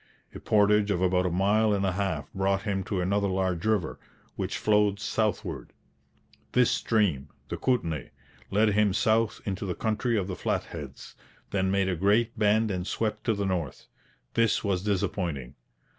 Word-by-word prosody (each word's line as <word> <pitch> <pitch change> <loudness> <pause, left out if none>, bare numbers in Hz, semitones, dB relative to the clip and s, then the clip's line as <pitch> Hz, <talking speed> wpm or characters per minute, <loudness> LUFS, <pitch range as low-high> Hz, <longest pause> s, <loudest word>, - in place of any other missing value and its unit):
A - - -8
portage 105 0 +3
of 100 -4 +1
about 90 0 +2
a - - 0
mile 105 +5 +2
and 100 0 0
a 95 - +1
half 95 +1 -2
brought 95 0 0
him 100 -3 -1
to 95 -3 -2
another 100 +2 +1
large 95 -2 -1
river, 105 -7 0 0.4
which - - -3
flowed 105 -1 +2
southward. 110 -1 -2 0.8
This 125 -1 +4
stream 85 - +1 0.2
the - - -3
Kootenay 85 - -1 0.4
led 105 +2 +3
him 105 -1 +2
south 110 0 +1
into 95 -2 -3
the 90 -3 -3
country 110 +1 0
of 100 - 0
the 95 - -4
Flatheads, - - -4 0.4
then 95 -1 +1
made 100 0 +1
a 95 - 0
great 105 +6 +1
bend 110 +1 +3
and 90 -1 -3
swept 110 -1 -2
to 115 - +2
the 100 0 -2
north. 90 -6 -3 0.5
This 115 -1 +2
was 95 -3 0
disappointing. 90 -9 -2
100 Hz, 165 wpm, -27 LUFS, 95-105 Hz, 0.8 s, This